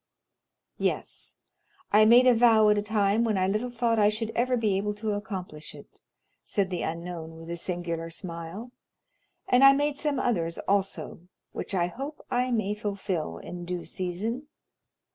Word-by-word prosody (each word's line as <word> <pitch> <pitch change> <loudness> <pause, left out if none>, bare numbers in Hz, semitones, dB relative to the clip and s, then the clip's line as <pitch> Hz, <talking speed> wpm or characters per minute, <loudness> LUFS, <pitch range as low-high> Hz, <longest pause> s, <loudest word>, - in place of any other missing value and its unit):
"Yes. - - -2 0.6
I 215 +1 +7
made 240 +3 +7
a 250 - +7
vow 225 -2 +5
at 210 - +4
a - - 0
time 210 +1 +2
when 220 -3 +1
I 185 0 +2
little 215 +5 -1
thought 235 -1 +1
I 205 0 +5
should 220 +1 -2
ever 250 +2 +1
be 215 -4 +1
able 205 +2 -1
to 215 +1 -2
accomplish 185 -7 -5
it," - - -15 0.4
said 195 -2 -1
the 180 - -2
unknown 165 -1 -5
with 165 +1 -9
a - - -2
singular 170 -1 -4
smile; 170 +6 -7 0.8
"and 250 +2 +4
I 275 0 +10
made 285 +1 0
some 295 -2 0
others 170 -10 0
also 195 -2 -1 0.3
which - - -4
I 175 -2 +2
hope 270 - -7
I 250 +1 +1
may 215 -4 0
fulfil 195 - -3
in 175 - -8
due 175 0 -4
season." 210 - -3
205 Hz, 165 wpm, -27 LUFS, 175-235 Hz, 0.8 s, I